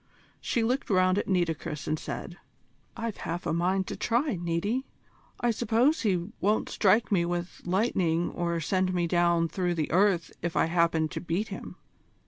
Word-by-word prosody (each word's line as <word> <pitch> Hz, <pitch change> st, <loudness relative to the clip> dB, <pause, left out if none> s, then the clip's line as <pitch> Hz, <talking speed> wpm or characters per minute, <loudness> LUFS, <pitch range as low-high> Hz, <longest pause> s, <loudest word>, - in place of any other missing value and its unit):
She 235 Hz, -, 0 dB
looked 255 Hz, +4 st, 0 dB
round 185 Hz, 0 st, +3 dB
at -, -, -3 dB
Nitocris, 170 Hz, -5 st, -1 dB
and 155 Hz, 0 st, 0 dB
said: -, -, -6 dB, 0.6 s
"I've 230 Hz, -2 st, -3 dB
half 170 Hz, +2 st, -4 dB
a -, -, 0 dB
mind 185 Hz, +3 st, +1 dB
to -, -, -5 dB
try, 245 Hz, +1 st, 0 dB
Niti. 175 Hz, +9 st, -1 dB, 0.5 s
I 240 Hz, -, +2 dB
suppose 235 Hz, +7 st, +2 dB
he 185 Hz, -4 st, 0 dB
won't 210 Hz, +2 st, +1 dB
strike 210 Hz, +1 st, +3 dB
me 180 Hz, -4 st, +3 dB
with 175 Hz, +1 st, -3 dB
lightning 180 Hz, -3 st, +1 dB
or 170 Hz, -1 st, -1 dB
send 185 Hz, +3 st, 0 dB
me 175 Hz, -1 st, +1 dB
down 170 Hz, -1 st, +2 dB
through 175 Hz, 0 st, -1 dB
the 155 Hz, -3 st, -2 dB
earth 185 Hz, -2 st, +3 dB
if 170 Hz, 0 st, -3 dB
I -, -, +4 dB
happen 165 Hz, -1 st, +2 dB
to -, -, -5 dB
beat 180 Hz, +6 st, -2 dB
him. -, -, -7 dB
180 Hz, 170 wpm, -28 LUFS, 170-210 Hz, 0.6 s, I